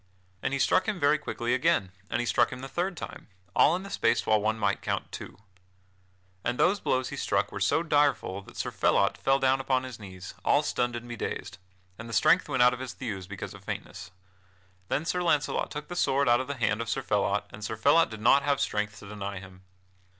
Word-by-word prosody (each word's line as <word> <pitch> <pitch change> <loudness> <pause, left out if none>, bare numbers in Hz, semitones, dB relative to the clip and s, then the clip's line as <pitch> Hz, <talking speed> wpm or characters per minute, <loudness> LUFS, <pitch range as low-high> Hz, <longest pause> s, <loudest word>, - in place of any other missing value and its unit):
And - - -1
he 140 - 0
struck 185 +8 +2
him 210 -4 -1
very 150 +1 +3
quickly 120 -5 -2
again, 160 - +2 0.2
and - - 0
he 120 - -1
struck - - +2
him 125 - -7
the 135 - -6
third 175 +5 -2
time, - - -8 0.3
all 160 - +5
in 185 - -4
the 200 - -8
space 115 +1 +1
whilst 110 -1 +3
one 110 +1 0
might 100 -2 0
count - - -3
two. - - -8 1.1
And 125 +1 -1
those 200 +3 +3
blows 130 -6 0
he - - -5
struck - - 0
were - - -5
so 160 - +2
direful 145 - +1
that - - -15
Sir - - -2
Phelot - - +2
fell 135 0 +2
down 135 0 +2
upon 130 -1 +1
his 130 -4 -8
knees, 95 -2 -9
all 145 - +3
stunned 120 -4 -1
and 120 0 -6
bedazed, 115 -6 -5 0.4
and 115 +1 -8
the - - -6
strength 110 - +4
went 125 - +3
out 125 0 +6
of 125 - -6
his 130 -2 -5
thews 100 -8 -5
because 100 0 -7
of - - -13
faintness. 90 - -6 0.8
Then 150 - -1
Sir 180 +1 0
Launcelot 150 -4 +1
took 150 0 -6
the 175 - -6
sword 140 -4 +2
out 120 0 +5
of 130 - -3
the 145 - -3
hand 110 -1 +1
of 115 - -4
Sir - - -1
Phelot 105 0 +1
and 105 - -10
Sir 110 +1 -4
Phelot 165 +9 +4
did 110 -1 -8
not 135 +5 +5
have 140 -1 +1
strength 105 -4 -1
to 100 - -11
deny 100 -1 -5
him. 95 0 -11
125 Hz, 230 wpm, -28 LUFS, 105-145 Hz, 1.1 s, out